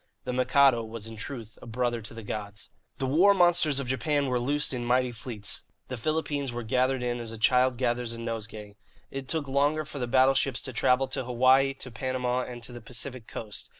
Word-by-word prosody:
The 125 - -3
Mikado 130 -1 +4
was 110 -1 -7
in 115 0 -7
truth 115 -1 -7
a - - -11
brother 120 0 -1
to 110 +2 -9
the 115 - -8
gods. 105 0 -6 0.3
The 135 - -2
war 175 +10 +5
monsters 175 -5 +4
of 140 - -3
Japan 140 +3 +1
were 125 -2 0
loosed 145 +4 +1
in 125 -1 -3
mighty 125 +1 +2
fleets. 115 -3 -5 0.3
The 130 - -3
Philippines 145 +1 -1
were 120 0 -4
gathered 130 +2 +1
in 120 0 -1
as 115 -1 -5
a 115 - -6
child 125 +2 +3
gathers 120 -1 0
a 115 - -5
nosegay. 110 -3 -6 0.3
It 135 -1 -5
took 155 0 -2
longer 145 +3 +1
for 145 -1 -7
the 125 - -2
battleships 130 0 +3
to 130 - -4
travel 125 +3 +3
to 130 - -2
Hawaii, 130 +2 +4
to 130 -1 -7
Panama, 125 +1 -1
and 120 -1 -8
to 120 - -5
the 120 - -8
Pacific 125 0 -6
Coast. 105 -2 -7
125 Hz, 210 wpm, -28 LUFS, 115-135 Hz, 0.3 s, war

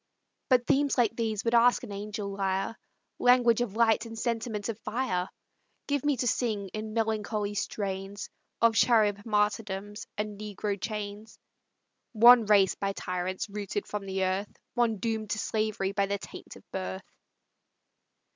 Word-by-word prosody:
But 250 -2 +4
themes 285 0 +2
like 230 -2 +2
these 225 -2 -1
would 230 - +1
ask 240 +1 +5
an 230 - -7
angel 205 0 -5
lyre, 195 +2 -1 0.4
Language 245 -2 +5
of 220 -4 -2
light 230 0 +3
and 225 0 -9
sentiment 225 -2 -2
of 225 -2 -4
fire; 195 -7 -2 0.6
Give 285 -2 -1
me 290 -2 +2
to 245 - 0
sing, 210 -5 0
in 215 +2 -6
melancholy 215 -2 -1
strains, 200 -1 -4 0.3
Of 230 -1 +5
Charib 215 -3 +3
martyrdoms 210 -1 -1
and 210 -1 -4
Negro 205 -1 -4
chains; 210 0 -5 0.8
One 235 0 +8
race 200 -3 +5
by 195 0 -2
tyrants 185 +1 -3
rooted 205 -1 -4
from 205 -1 -5
the 190 0 -1
earth, 190 +2 -1 0.2
One 235 -3 +1
doom'd 220 0 -2
to 215 - -1
slavery 215 -3 -1
by 200 0 +1
the 200 +1 -1
taint - - -10
of - - -14
birth! 95 0 -4
210 Hz, 150 wpm, -29 LUFS, 200-230 Hz, 0.8 s, One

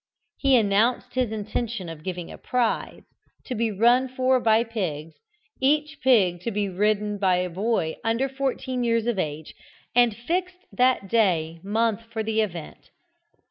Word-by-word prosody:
He 275 -1 +4
announced 220 +2 +2
his 255 -4 0
intention 215 -1 -3
of 165 -2 -8
giving 180 -2 -5
a - - -9
prize, 250 -2 -1 0.4
to - - -4
be 230 -1 0
run 240 +5 +3
for 255 0 +2
by 225 -1 +3
pigs, 165 -9 -4 0.5
each 300 +2 +1
pig 195 -10 +3
to 235 - -2
be 205 -2 -1
ridden 210 +2 0
by 190 -2 +3
a 180 0 -1
boy 190 -3 -1
under 230 +4 +1
fourteen 260 -2 -2
years 230 -1 +1
of 235 -5 0
age, 155 -2 -4 0.4
and 240 -3 +4
fixed 360 +8 -3
that 250 -5 +2
day 170 -7 +1
month 220 +2 0
for 220 -1 -2
the 220 0 +1
event. 175 -7 -6
225 Hz, 155 wpm, -25 LUFS, 190-250 Hz, 0.5 s, He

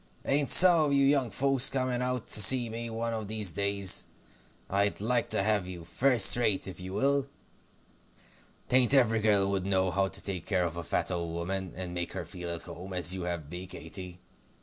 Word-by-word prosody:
Ain't 140 0 -1
some 175 -4 +8
of 145 - -2
you 140 0 +2
young 135 -3 +1
folks 135 +5 +4
coming 130 -2 -3
out 125 -2 -4
to 105 - +4
see 125 0 +5
me 115 +1 -7
one 115 +1 -5
of 110 -2 -6
these 105 -3 -1
days? 100 0 0 0.6
I'd 100 +1 -2
like 115 +3 -2
to 100 - 0
have 105 -3 -1
you, 90 -2 -9
first 125 +6 +5
rate, 110 -6 -2
if 95 - -10
you 95 +1 -9
will. 140 +4 -1 1.4
'Tain't 130 +2 +2
every 115 -4 +2
girl 105 -2 +1
would 95 -1 -3
know 95 -1 0
how 95 +2 -1
to - - -5
take 95 -4 -6
care 95 -2 -1
of 85 -1 -6
a 85 - -6
fat 85 - -3
old 85 -2 -5
woman, 95 +2 -5
and 90 -1 -7
make 85 -1 -6
her - - -6
feel 85 -1 -8
to 85 - -10
home, 95 +3 -10
as 90 0 +3
you 95 -2 -5
have 85 -4 -6
me, 90 +1 -8
Katy. 90 -1 -7
100 Hz, 205 wpm, -27 LUFS, 90-125 Hz, 1.4 s, some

